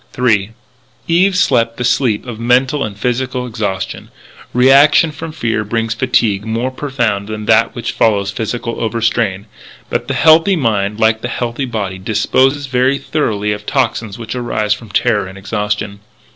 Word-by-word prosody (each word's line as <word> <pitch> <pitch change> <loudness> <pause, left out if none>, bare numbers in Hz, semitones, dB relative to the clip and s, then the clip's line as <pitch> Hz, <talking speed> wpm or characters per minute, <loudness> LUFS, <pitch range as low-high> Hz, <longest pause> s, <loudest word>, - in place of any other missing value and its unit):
III 110 -5 +2 0.6
Eve 185 +3 +3
slept 115 -9 +2
the 125 - -3
sleep 120 -3 +1
of 120 -3 -7
mental 130 +4 +2
and 105 -2 -5
physical 125 +2 -2
exhaustion. 105 -5 -4 0.4
Reaction 140 +5 +5
from 155 +2 -7
fear 115 -7 -1
brings 115 +1 -1
a - - -16
fatigue 115 -6 +1
more 115 +4 -2
profound 120 -8 -2
than 110 0 -5
that 115 +1 +3
which 120 -1 -3
follows 100 -3 +1
physical 115 +3 -4
overstrain. 115 -3 0 0.5
But - - -2
the - - -2
healthy 165 +5 +5
mind, 105 - 0
like 110 0 +2
the 120 - -3
healthy 120 +2 -3
body, 100 -6 -4
disposes 130 +8 +1
very 130 +1 +1
thoroughly 105 -10 -1
of 105 0 -5
toxics 110 -4 -1
which 115 -2 -6
arise 115 -4 -1
from 110 +1 -10
terror 105 -4 +1
and 95 +1 -11
exhaustion. 105 0 -3
115 Hz, 160 wpm, -16 LUFS, 105-130 Hz, 0.6 s, Reaction